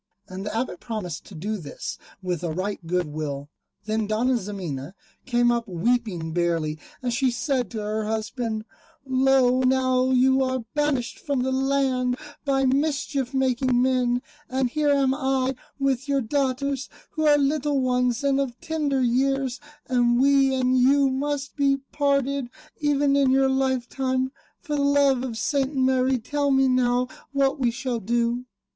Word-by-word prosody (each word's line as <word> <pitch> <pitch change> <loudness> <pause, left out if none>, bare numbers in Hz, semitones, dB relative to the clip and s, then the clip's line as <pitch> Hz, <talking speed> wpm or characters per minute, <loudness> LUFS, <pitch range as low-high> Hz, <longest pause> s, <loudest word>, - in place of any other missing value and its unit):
And 185 +1 -7
the 210 +2 -3
Abbot 230 -7 -2
promised 190 -8 -5
to 195 - -12
do 210 +7 -3
this 155 -7 -7 0.2
with 180 -3 -2
a 170 - -1
right 185 +3 -3
good 180 +1 +1
will. 145 -1 -5 0.3
Then 215 0 -1
Dona 235 +5 +1
Ximena 185 - -5 0.3
came 240 -1 +3
up 235 -1 -1
weeping 185 -3 -1
bitterly, 165 -2 0 0.2
and 245 -1 -1
she 260 +1 +2
said 255 0 -1
to 220 -3 -5
her 215 +1 -2
husband, 220 0 -3 0.4
"Lo 260 -1 +3
now 255 0 +2
you 260 +1 +4
are 260 -2 -2
banished 295 -5 -1
from 285 -9 -1
the 260 - 0
land 260 -2 +1 0.3
by 270 -1 +2
mischief 275 -1 0
making 260 -1 +2
men, 250 -1 +1 0.3
and 260 -1 0
here 300 0 +1
am 275 -2 +3
I 265 -1 0 0.2
with 275 -1 0
your 275 -1 +2
daughters, 275 +1 -1 0.2
who 315 -1 0
are 295 -1 +6
little 290 0 +1
ones 250 0 +1
and 275 -1 +2
of 255 -3 -3
tender 300 -5 -1
years, 265 +1 +1 0.3
and 240 -1 +2
we 275 0 +4
and 255 0 +2
you 275 +2 +4
must 280 +1 -2
be 275 -1 +2
parted, 280 -2 0 0.3
even 290 -1 +2
in 280 -2 +4
your 265 0 +4
lifetime. 260 0 0 0.3
For 300 -4 -2
the 285 - 0
love 280 -2 +3
of 240 -4 -4
St. 280 +3 0
Mary 260 0 +2
tell 285 +4 -1
me 270 -1 +4
now 250 -1 +2 0.3
what 275 +1 +1
we 250 -3 +2
shall 240 0 -3
do." 235 +3 0
260 Hz, 160 wpm, -24 LUFS, 235-275 Hz, 0.4 s, are